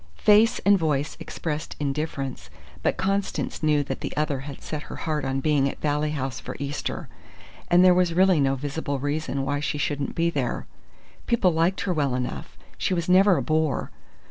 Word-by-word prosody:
Face 215 +3 +5
and 200 -1 +6
voice 150 -2 0
expressed 155 -2 -4
indifference; 140 - -3 0.3
but - - 0
Constance 195 +1 -1
knew 150 -2 +3
that 140 - -5
the - - -5
other 150 -3 0
had 135 0 -8
set 155 -1 -4
her - - -6
heart 155 -3 -2
on 135 0 -1
being 140 -2 +2
at - - -8
Valley 150 0 0
House 135 -3 -3
for - - -7
Easter; 140 +1 -4 0.6
and 180 +1 +5
there 180 - +7
was 180 -2 +2
really 185 -2 +5
no 135 -1 +2
visible 145 +1 -3
reason 145 0 -2
why 145 +1 -1
she 150 0 -2
shouldn't 145 0 -2
be 170 0 +1
there. 135 -6 -2 0.6
People 215 -6 +3
liked 165 +4 +1
her 180 -1 0
well 140 -5 0
enough: 125 -1 -4 0.2
she 185 - +1
was 170 +1 -2
never 185 +1 +5
a - - -1
bore. 155 -2 0
150 Hz, 185 wpm, -25 LUFS, 140-175 Hz, 0.6 s, there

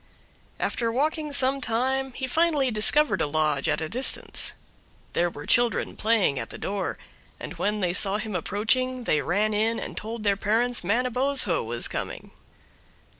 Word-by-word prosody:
After 230 -1 -1
walking 300 +4 -1
some 275 0 +1
time 265 +3 -1
he 265 - -4
finally 295 -2 +1
discovered 280 +8 +3
a - - 0
lodge 150 -2 0
at - - 0
a 160 - -2
distance. 255 +9 +3 0.6
There 175 0 +1
were 145 -3 -10
children 240 -1 +1
playing 210 -11 +1
at 115 - -5
the - - -9
door, 200 0 -4 0.4
and - - -7
when 210 +1 -1
they 180 -2 0
saw 195 +1 +4
him 215 0 -6
approaching 245 +8 -1
they 155 -9 +1
ran 210 +5 0
in 220 +2 0
and - - -7
told 225 +1 -6
their 200 -1 +2
parents 225 +4 0
Manabozho 250 0 +2
was 115 +1 -2
coming. - - -6
225 Hz, 160 wpm, -25 LUFS, 195-255 Hz, 0.6 s, saw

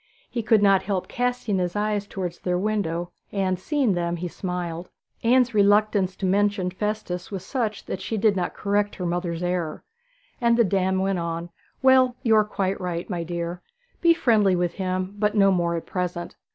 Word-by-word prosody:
He 235 - -1
could 220 -2 +3
not 195 -1 +5
help 195 -2 -2
casting 245 -5 -1
his 180 0 -2
eyes 210 -1 -1
towards 180 -4 -5
their 180 -1 -1
window, 180 -4 -1 0.2
and, 190 -2 0
seeing 270 0 +1
them, 170 -1 -1
he 175 +1 -4
smiled. 175 -1 -4 0.3
Anne's 250 +1 +3
reluctance 205 -2 +3
to 195 - -4
mention 200 -1 +1
Festus 185 -2 -3
was 190 -2 -6
such 225 -5 -2
that 190 - -5
she 220 - -3
did 210 -1 +3
not 180 -2 -2
correct 205 0 0
her 180 - -4
mother's 175 0 -2
error, 175 -3 -2 0.6
and 235 -1 +4
the 235 - +6
dame 190 -1 +1
went 190 -1 0
on: 170 0 -4 0.3
'Well, 260 -1 +5
you 225 -2 +4
are 215 - +6
quite 195 -2 -2
right, 175 -1 -3
my 175 -2 -2
dear. 170 +1 -4 0.4
Be 335 -1 +5
friendly 210 - +3
with 175 -1 0
him, 185 +1 -3
but 210 0 +1
no 195 -1 +5
more 170 -2 +1
at 165 - -4
present. 180 -2 -4
190 Hz, 185 wpm, -24 LUFS, 180-210 Hz, 0.6 s, the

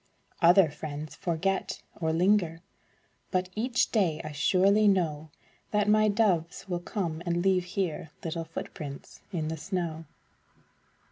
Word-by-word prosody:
Other 175 -1 +6
friends 150 0 -6
forget, 185 +3 -2
or 160 -1 -1
linger, 170 -1 +2 0.7
But 185 -1 0
each 240 +4 +1
day 180 -9 +2
I 155 - -5
surely 195 +8 +4
know 160 -6 +1 0.4
That 210 -1 +1
my 215 0 +5
doves 195 -5 +1
will 175 -2 -2
come 170 -3 -3
and 175 0 0
leave 185 -2 +3
here 180 -3 -3
Little 165 0 -3
footprints 150 -3 -8
in 160 -5 -2
the 160 - -3
snow. 165 -1 -3
175 Hz, 130 wpm, -28 LUFS, 160-195 Hz, 0.7 s, Other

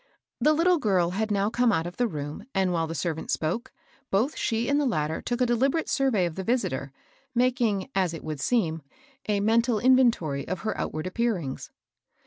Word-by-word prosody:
The 305 - +4
little 340 +2 +3
girl 185 -8 +2
had 215 +4 -1
now 205 +1 +1
come 240 0 +3
out 165 -4 0
of 175 - -7
the 245 - +2
room, 150 +2 -6
and 190 -2 +2
while 165 -1 0
the 165 - -5
servant 160 -2 -3
spoke, 170 +10 -2 0.4
both 225 +10 +1
she 230 +1 -1
and 285 +1 +2
the 285 - +1
latter 155 -8 -1
took 240 +1 -2
a - - +5
deliberate 265 +7 +1
survey 260 -10 +2
of 170 - -3
the 190 - -5
visitor, 160 - -1 0.4
making, 240 -5 +1
as 185 -3 +1
it 165 - -7
would 155 -2 -5
seem, 165 - 0 0.5
a 205 -1 +2
mental 230 +2 +3
in 255 +4 +5
ventory 170 - +2
of 185 - -3
her 220 - -2
outward 155 +2 -3
appearings. 185 - -2
205 Hz, 195 wpm, -26 LUFS, 165-245 Hz, 0.5 s, a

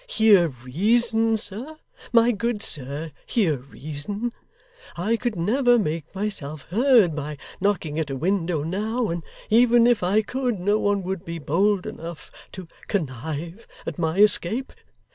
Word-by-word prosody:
Hear 215 - +5
reason, 220 - +1
sir. 225 +9 -3 0.4
My 235 0 +5
good 225 -1 -2
sir, 145 +3 -2 0.2
hear 180 - +1
reason. 155 - -5 0.7
I 210 +7 +1
could 240 -1 -2
never 245 +8 +3
make 165 -5 -3
myself 155 -8 -3
heard 225 - +4
by 150 0 -5 0.2
knocking 180 -6 0
at 155 -3 -2
a 135 - -3
window 170 0 0
now; 215 +8 -1
and 170 -1 -4 0.3
even 235 +1 +6
if 240 -2 +3
I 200 +5 +2
could, 250 -2 -2
no 205 +4 +2
one 205 -2 +1
would 190 -1 -4
be 170 -2 -5
bold 180 +6 +1
enough 165 -1 -8 0.2
to 185 -2 -8 0.2
connive 160 - -4 0.2
at - - -5
my 160 -1 0
escape. 210 +4 +2
195 Hz, 145 wpm, -24 LUFS, 160-225 Hz, 0.7 s, even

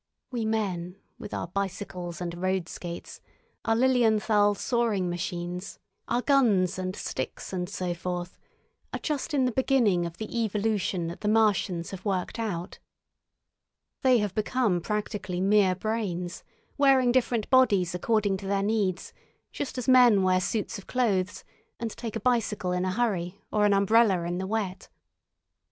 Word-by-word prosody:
We 235 -3 -2
men, 185 -5 -2 0.2
with - - -8
our - - -3
bicycles 180 -1 -4
and 175 0 -5
road 185 -2 0
skates, 170 -1 -8 0.4
our 225 - +2
Lilienthal 220 -4 +3
soaring 215 -6 0
machines, 175 +1 -4 0.3
our 240 +1 0
guns 205 - +3
and 185 0 -3
sticks 130 +3 -5
and 180 -1 -2
so 180 -3 -2
forth, 175 +1 -5 0.5
are - - -2
just 300 -4 -2
in 275 -3 +2
the 250 - +1
beginning 230 -9 +2
of 170 0 -10
the 220 +2 -3
evolution 205 -4 -1
that 170 +1 -6
the 210 - -2
Martians 205 -5 +2
have 195 - -8
worked 195 +2 -2
out. 185 -6 -4 1.2
They 255 -3 +5
have 210 -4 -1
become 215 -4 +1
practically 205 -2 -3
mere 195 -1 +4
brains, 190 -4 -3 0.4
wearing 265 -3 +5
different 240 -3 +1
bodies 200 -10 +4
according 205 +1 +1
to 195 0 -8
their 195 0 +1
needs 200 -3 -1 0.4
just 280 - -5
as 250 - -3
men 245 -6 +6
wear 185 0 +3
suits 210 +1 -2
of 195 - -14
clothes 205 -6 0 0.4
and 230 -1 -3
take 230 -1 -6
a - - -1
bicycle 210 -5 0
in 180 0 0
a 185 - 0
hurry 195 -4 -1
or 210 -1 +3
an 205 - +3
umbrella 200 -2 +4
in 175 +1 -2
the 190 - -3
wet. 205 -3 -3
200 Hz, 155 wpm, -27 LUFS, 180-225 Hz, 1.2 s, men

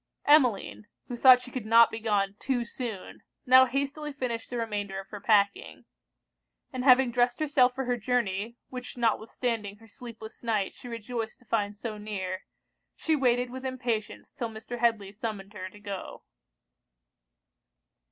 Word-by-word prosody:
Emmeline, 225 - +3 0.2
who 245 - -3
thought 250 +1 +7
she 250 0 -11
could 240 -4 -5
not 230 +1 +7
be 225 - -5
gone 205 -3 0
too 245 -3 -1
soon, 235 -5 -6 0.2
now 255 +1 +8
hastily 280 +3 -2
finished 250 -5 -4
the 245 - -4
remainder 205 -4 -3
of 195 - -9
her 205 -2 -8
packing; 210 - +1 0.9
and 255 -1 -3
having 255 -1 +6
dressed 245 0 +1
herself 275 -5 +3
for 265 - -2
her 245 0 0
journey, 230 -1 -1
which 250 -1 -8
notwithstanding 225 -2 -1
her 225 +2 -18
sleepless 225 -1 -11
night 215 -4 -1
she - - -12
rejoiced 230 -1 -5
to 250 - -25
find 205 -2 -1
so 215 -1 -5
near, 190 -3 -4 0.5
she 320 - +1
waited 245 -3 +2
with 260 +1 -7
impatience 240 -5 -3
'till 235 -5 -4
Mr. 225 +2 -7
Headly 225 -4 +1
summoned 205 -2 -6
her 185 -2 -6
to 205 - -15
go. 200 -2 -7
230 Hz, 155 wpm, -28 LUFS, 210-250 Hz, 0.9 s, now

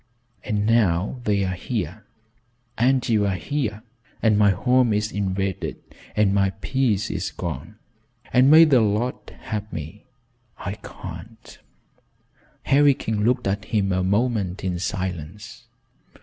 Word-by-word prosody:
And 105 -1 -1
now 105 0 +2
they're 100 -3 +1
here, 100 - -4 0.7
and 130 +2 +2
you're 105 -4 +2
here, 110 - -3 0.4
and 110 -2 +4
my 105 0 +5
home 120 +5 +3
is 105 +1 -1
invaded, 95 -2 -2 0.4
and 105 -2 +3
my 100 -1 +3
peace 120 -5 0
is - - -2
gone, - - -6 0.6
and 130 +2 +6
may 160 +2 +9
the 135 -6 +4
Lord 110 +4 +1 0.3
help 105 -1 -5
me 80 - -8 0.5
I 100 - -4
can't." 100 +2 -11 1.0
Harry 140 0 +4
King 110 -4 -2
looked 120 +3 +1
at 100 +2 -1
him 100 -3 0
a 95 0 +1
moment 100 -2 0
in 90 -2 -2
silence. 100 +5 -5
105 Hz, 125 wpm, -23 LUFS, 95-120 Hz, 1.0 s, may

